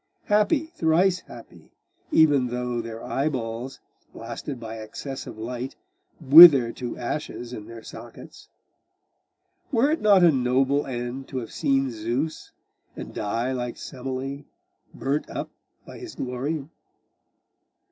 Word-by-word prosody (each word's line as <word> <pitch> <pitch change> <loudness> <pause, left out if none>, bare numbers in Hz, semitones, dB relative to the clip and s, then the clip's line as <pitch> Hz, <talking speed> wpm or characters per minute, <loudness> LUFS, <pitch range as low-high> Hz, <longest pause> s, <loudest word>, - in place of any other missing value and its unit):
Happy, 215 +9 +2
thrice 175 - +2
happy,! - - -14 0.4
even 145 - +4
though 125 0 -3
their 115 0 -8
eyeballs, 130 -3 -3 0.3
blasted 135 -4 -7
by 115 -1 -7
excess 135 +5 -7
of - - -9
light, 125 +4 -5 0.4
wither 145 -5 +9
to 120 0 -6
ashes 125 -1 -5
in 105 -3 -8
their 115 -1 -10
sockets! - - -12 1.2
Were 270 +3 +3
it 320 - -1
not 200 -3 +5
a 170 - +7
noble 135 +2 +1
end 125 +1 -5
to 130 - -6
have 115 -3 -5
seen 135 -1 0
Zeus, 120 +8 -3 0.4
and - - -8
die 115 +5 -2
like 125 -2 -4
Semele, 135 +2 -6 0.5
burnt 140 +3 -2
up - - -5 0.3
by - - -11
his 365 -3 -9
glory? 135 +4 -3
130 Hz, 125 wpm, -25 LUFS, 120-150 Hz, 1.2 s, wither